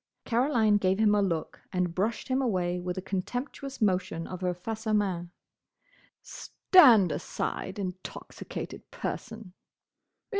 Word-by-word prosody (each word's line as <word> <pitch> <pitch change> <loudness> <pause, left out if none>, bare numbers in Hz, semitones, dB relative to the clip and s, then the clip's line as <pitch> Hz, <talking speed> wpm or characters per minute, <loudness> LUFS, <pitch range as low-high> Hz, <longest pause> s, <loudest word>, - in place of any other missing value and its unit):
Caroline 230 -4 +3
gave 190 -1 +1
him 215 -1 +4
a 205 - +3
look 165 -5 -2
and 180 -3 0
brushed 210 +6 -1
him 260 +1 +1
away 180 -7 0
with 180 0 -4
a 185 - -4
contemptuous 250 +8 -4
motion 185 -5 0
of 185 0 -7
her 180 -1 0
face 220 +5 -6
à 215 -1 +2
main. 185 -4 -1 0.9
"Stand 240 - +5
aside, - - -4
intoxicated 185 -2 -7
person!" 185 -5 -6
195 Hz, 125 wpm, -28 LUFS, 180-225 Hz, 0.9 s, Stand